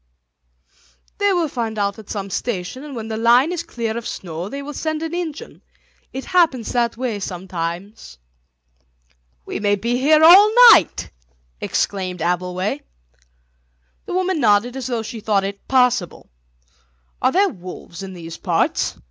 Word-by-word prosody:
"They 405 Hz, 0 st, +3 dB
will 350 Hz, -4 st, +1 dB
find 230 Hz, -5 st, -4 dB
out 200 Hz, 0 st, -1 dB
at 215 Hz, -, -13 dB
some 200 Hz, -2 st, -5 dB
station, 230 Hz, +5 st, -4 dB
and 295 Hz, -3 st, -8 dB
when 225 Hz, -2 st, -5 dB
the 220 Hz, -1 st, -4 dB
line 240 Hz, +7 st, +4 dB
is 355 Hz, -, -2 dB
clear 225 Hz, -2 st, -4 dB
of 235 Hz, -1 st, -5 dB
snow 175 Hz, +1 st, -6 dB
they 280 Hz, +3 st, -6 dB
will 295 Hz, +1 st, -7 dB
send 315 Hz, +2 st, -3 dB
an 325 Hz, 0 st, -4 dB
engine. 335 Hz, -4 st, -6 dB, 0.5 s
It 265 Hz, -, -6 dB
happens 315 Hz, -10 st, +2 dB
that 235 Hz, -2 st, 0 dB
way 240 Hz, -4 st, -2 dB
sometimes." 180 Hz, -, -6 dB, 1.3 s
"We -, -, -5 dB
may 205 Hz, -1 st, +2 dB
be 235 Hz, +4 st, -1 dB
here 310 Hz, +3 st, +4 dB
all 385 Hz, +6 st, +9 dB, 0.2 s
night!" 175 Hz, -, +3 dB, 0.5 s
exclaimed 185 Hz, -3 st, -2 dB
Abbleway. 180 Hz, +1 st, -1 dB, 1.3 s
The -, -, -3 dB
woman 370 Hz, -2 st, 0 dB
nodded 220 Hz, +1 st, +3 dB
as 260 Hz, -2 st, -4 dB
though 235 Hz, -3 st, -2 dB
she 225 Hz, +1 st, -7 dB
thought 210 Hz, -2 st, +1 dB
it 200 Hz, 0 st, -6 dB
possible. 250 Hz, -, +1 dB, 0.9 s
"Are -, -, +3 dB
there 395 Hz, +4 st, +3 dB
wolves 180 Hz, -1 st, -10 dB
in 190 Hz, -1 st, -7 dB
these 165 Hz, -2 st, -9 dB
parts?" -, -, 0 dB
225 Hz, 150 wpm, -20 LUFS, 195-280 Hz, 1.3 s, all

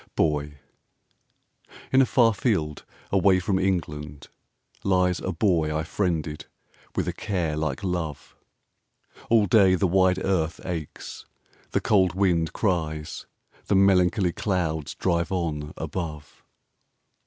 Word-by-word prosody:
BOY 75 Hz, -2 st, 0 dB, 1.4 s
In 130 Hz, -, +6 dB
a 130 Hz, -, +3 dB
far 115 Hz, -3 st, +4 dB
field, 85 Hz, -, -1 dB, 0.3 s
away 95 Hz, -1 st, +4 dB
from 95 Hz, +1 st, 0 dB
England, 75 Hz, -6 st, -3 dB, 0.5 s
lies 90 Hz, -2 st, +2 dB
A -, -, -3 dB
Boy 80 Hz, -4 st, +1 dB
I 80 Hz, -, -1 dB
friended 80 Hz, -4 st, -2 dB, 0.5 s
with -, -, -1 dB
a -, -, -1 dB
care 90 Hz, -7 st, -2 dB
like 75 Hz, +2 st, -3 dB
love; 85 Hz, -6 st, -4 dB, 0.9 s
All 115 Hz, -3 st, +5 dB
day 95 Hz, -2 st, +5 dB
the 95 Hz, -, +1 dB
wide 95 Hz, 0 st, +3 dB
earth 85 Hz, -4 st, 0 dB
aches, 85 Hz, -5 st, -6 dB, 0.4 s
the -, -, 0 dB
cold 95 Hz, -4 st, +3 dB
wind 85 Hz, -4 st, +1 dB
cries, 80 Hz, -6 st, -2 dB, 0.4 s
The 100 Hz, -, +2 dB
melancholy 95 Hz, -1 st, +4 dB
clouds 80 Hz, -7 st, -2 dB
drive 85 Hz, -1 st, 0 dB
on 80 Hz, -5 st, -2 dB
above. 75 Hz, -5 st, -6 dB
90 Hz, 120 wpm, -25 LUFS, 80-95 Hz, 1.4 s, In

